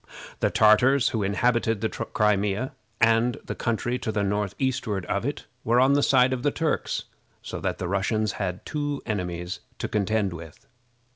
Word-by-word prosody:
The - - +2
Tartars 125 +5 +5
who 110 - -2
inhabited 115 +2 +1
the 110 - 0
Crimea 105 +3 0 0.3
and 115 +2 +3
the - - -3
country 120 +2 -1
to 115 - -2
the 105 -2 0
northeastward 105 0 -1
of - - -1
it - - -4 0.2
were 120 +2 +3
on 130 +2 +5
the 145 - +3
side 130 -2 +4
of 125 - -3
the 145 - +2
Turks, 160 +1 -1 0.4
so - - -5
that - - -2
the 90 - -3
Russians 100 +3 0
had 90 -1 -3
two 145 -2 -3
enemies 90 -4 -3 0.2
to - - -3
contend 105 -2 0
with. 80 -2 -11
110 Hz, 165 wpm, -26 LUFS, 100-125 Hz, 0.4 s, Tartars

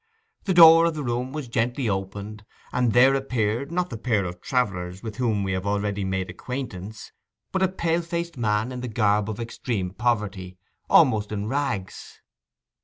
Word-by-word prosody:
The 190 - 0
door 165 -1 +9
of 165 - -2
the 150 - -4
room 125 +1 -2
was 150 -2 -5
gently 120 +2 -1
opened, 100 +2 -4 0.3
and 125 -2 +2
there 130 +4 +6
appeared, 125 0 -1
not 180 -1 -1
the 115 - -6
pair 110 -5 0
of 90 0 -7
travellers 95 -7 -2
with 110 -1 -6
whom 110 -5 0
we 95 - -2
have 95 +1 -2
already 100 0 -1
made 95 -1 -2
acquaintance, 110 -6 -7 0.4
but 190 - -1
a 190 - +4
pale 170 -2 -1
faced 170 0 -4
man 110 0 0
in 125 -1 -6
the 125 - -4
garb 105 -2 +1
of 110 0 -5
extreme 115 -5 -3
poverty—almost 105 - 0
in 105 0 -3
rags. 115 -7 -3
115 Hz, 170 wpm, -24 LUFS, 100-130 Hz, 0.4 s, door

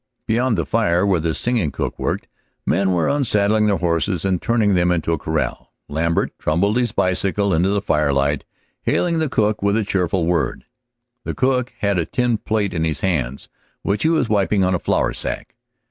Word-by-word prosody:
Beyond 115 0 +1
the 85 - 0
fire 85 +6 +1
where 95 -4 +2
the 80 0 -1
singing 120 -10 0
cook - - -4
worked, - - -2 0.4
men 95 +4 +2
were 85 -3 +1
unsaddling 105 -6 +2
their 100 -2 +2
horses 85 +2 0
and 95 -3 0
turning 110 -4 +2
them 90 -1 +2
into 85 -2 0
the 80 - +1
corral. 80 -1 -3
Lambert 85 +3 0
trundled 100 +8 +1
his 120 -3 +1
bicycle 100 0 +1
into 85 +4 +2
the 100 0 0
firelight, 70 -3 +1 0.4
hailing 170 -2 +1
the 155 -2 0
cook 110 -3 +1
with 100 +1 +2
a 110 - +1
cheerful 90 -3 0
word. 85 -7 -1 0.6
The - - -4
cook 130 -1 0
had 100 -3 +1
a 85 - -1
tin 120 -3 0
plate 105 -2 -1
in 80 -2 -1
his 80 -3 -1
hands, 70 -9 -1 0.4
which 100 +1 0
he 160 - +3
was 160 -7 +2
wiping 100 -1 +2
on 95 0 +2
a 90 - +1
flour - - 0
sack. - - -4
95 Hz, 190 wpm, -20 LUFS, 85-110 Hz, 0.6 s, he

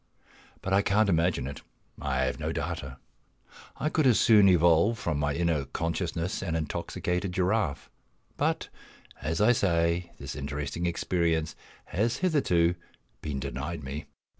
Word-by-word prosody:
But 95 - -1
I 100 - +5
can't 105 +1 +2
imagine 85 -5 +2
it; 70 0 -6 0.4
I 65 -3 0
have 65 - -2
no - - -2
data. 65 -1 -4 0.8
I 150 - 0
could 155 -3 +2
as 120 - +5
soon 105 -4 +6
evolve 85 +5 +4
from 85 -10 -2
my 75 -1 0
inner 85 -4 +1
consciousness 85 +4 -2
an 85 -4 -2
intoxicated 90 +4 -2
giraffe. 95 -4 0 0.5
But, - - -1 0.5
as 80 +5 -2
I 105 +3 +5
say, 85 -5 +1
this - - -7
interesting 75 +3 -3
experience 85 -2 0 0.3
has 115 +6 0
hitherto 90 - +2 0.5
been 70 -3 -3
denied 70 +4 -4
me. 70 +2 -5
85 Hz, 140 wpm, -28 LUFS, 75-95 Hz, 0.8 s, soon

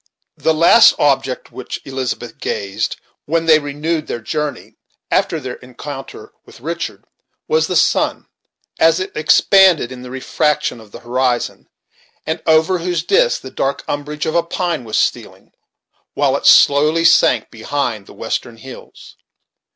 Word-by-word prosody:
The 160 - +1
last 170 +8 +6
object 135 -3 0
at - - -30
which 130 - -7
Elizabeth 130 -3 -5
gazed 100 -1 -3 0.3
when 165 +2 0
they 155 -1 +6
renewed 155 +2 -3
their - - -4
journey, 150 +6 -4 0.4
after 165 - +1
their 130 -3 -7
encountre 135 +2 -10
with - - -16
Richard, 165 +6 -5 0.4
was 470 0 +1
the - - -3
sun, - - +1 0.5
as 165 +2 +4
it 185 - -4
expanded 175 -2 +4
in 125 -1 -9
the 125 - -9
refraction 130 -1 -1
of 105 -2 -17
the - - -11
horizon, 125 0 -2 0.6
and 160 +1 -3
over 160 +3 +3
whose 170 -1 -2
disk 485 - +2
the 130 - -10
dark 140 +1 -2
umbrage 150 +1 -4
of 160 - -2
a 170 - +3
pine 170 -5 -3
was 110 - -2
stealing, - - -2 0.6
while - - +2
it - - -1
slowly 155 +4 +5
sank 120 -8 +4
behind 115 -3 -3
the - - -13
western 115 -1 -4
hills. 130 +3 -13
145 Hz, 150 wpm, -17 LUFS, 130-165 Hz, 0.6 s, last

